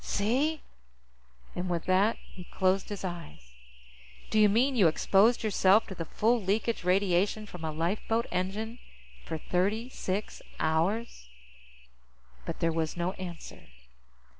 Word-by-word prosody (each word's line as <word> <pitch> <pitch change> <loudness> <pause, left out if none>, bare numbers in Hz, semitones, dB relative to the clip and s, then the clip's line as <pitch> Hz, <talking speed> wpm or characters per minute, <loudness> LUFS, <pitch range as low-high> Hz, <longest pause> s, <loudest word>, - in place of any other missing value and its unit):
See?" 270 +10 0 0.9
And 180 +1 -3
with 170 -2 -2
that, 195 +4 +3
he 180 - -13
closed 190 +1 0
his 205 -2 -6
eyes. 165 - -7 0.8
"Do 215 - +3
you 210 -1 +6
mean 250 +6 +2
you 200 -8 +5
exposed 200 +9 +3
yourself 210 0 +4
to - - -7
the 170 -3 -5
full 230 +7 +1
leakage 210 +3 -1
radiation 195 +3 +1
from 180 -5 -10
a 160 - -2
lifeboat 200 +8 -1
engine 210 +6 -3 0.4
for 160 - -4
thirty 200 +9 -1
six 200 -4 -4 0.2
hours?" 165 - -1 1.2
But - - -5
there 165 - +2
was 160 0 -2
no 175 +1 0
answer. 175 -3 -9
195 Hz, 135 wpm, -29 LUFS, 175-220 Hz, 1.2 s, you